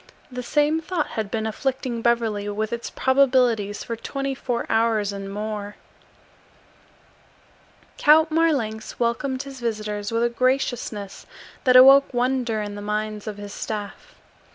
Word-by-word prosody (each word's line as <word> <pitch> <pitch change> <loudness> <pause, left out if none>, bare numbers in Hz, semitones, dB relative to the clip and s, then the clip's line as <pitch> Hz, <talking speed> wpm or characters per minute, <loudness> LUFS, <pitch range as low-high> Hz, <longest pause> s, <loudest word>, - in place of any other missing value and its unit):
The 250 0 -5
same 295 +5 +1
thought 335 -2 -2
had 220 -3 -4
been 220 +1 -2
afflicting 250 +1 -2
Beverly 225 -4 0
with 215 +2 -3
its 235 - -4
probabilities 250 -6 +2
for 230 - -4
twenty 275 +4 -4
four 245 -2 -3
hours 225 -2 +1
and 195 0 -6
more. 210 0 -5 2.2
Count 315 +2 +5
Marlanx 275 -10 0
welcomed 255 +3 -1
his 275 -2 -10
visitors 215 -2 -3
with 230 +1 +1
a - - +4
graciousness 240 -5 -2 0.4
that 255 -1 +5
awoke 270 +2 +8
wonder 245 -3 0
in 205 0 -6
the 205 - -7
minds 210 0 -3
of 210 -1 -5
his 205 0 -8
staff. 215 - -6
230 Hz, 135 wpm, -23 LUFS, 210-265 Hz, 2.2 s, awoke